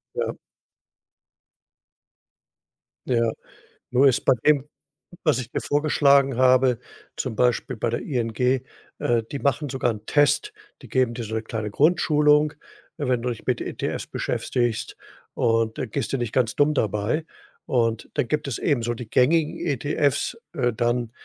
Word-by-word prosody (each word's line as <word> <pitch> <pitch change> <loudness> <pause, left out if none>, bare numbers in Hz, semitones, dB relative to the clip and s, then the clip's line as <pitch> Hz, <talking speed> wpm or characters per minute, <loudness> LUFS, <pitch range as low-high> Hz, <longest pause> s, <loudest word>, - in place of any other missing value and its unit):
Ja. - - -1 2.7
Ja, 115 -2 +2 0.6
nur 130 +3 +5
ist 130 - +2
bei - - +6
dem, 150 -3 +4 0.6
was 155 -6 +2
ich 120 -2 -6
dir - - -2
vorgeschlagen 140 -3 +3
habe, 130 -1 +4 0.4
zum 130 -4 -3
Beispiel 125 +2 +1
bei 115 - -1
der 120 - -2
ING, 120 -5 -2 0.7
äh, 120 -1 +1
die 140 - -3
machen 140 +2 0
sogar 130 -2 0
'n 105 -1 -9
Test, 150 - +2 0.3
die - - -12
geben 130 -3 +1
dir 120 - -4
so 110 0 -6
'ne 110 - -1
kleine 110 -1 -4
Grundschulung, 150 - +3 0.4
wenn 130 -4 0
du 125 - 0
dich 120 - -6
mit - - 0
ETFs - - -4
beschäftigst, 120 -3 -2 0.4
und 115 -1 +1
da - - -1
gehst 115 0 -3
du - - +2
nicht 120 -4 -3
ganz 120 -3 +1
dumm 150 +1 +3
dabei 110 +8 0 0.4
und 115 -3 0
dann - - 0
gibt 150 +3 -1
es 130 - -3
eben 140 -7 +1
so 120 +1 -1
die 120 -1 -8
gängigen 150 +6 +2
ETFs, 145 - 0 0.2
äh, 125 -6 +1
dann, 120 0 0
125 Hz, 155 wpm, -24 LUFS, 115-145 Hz, 2.7 s, bei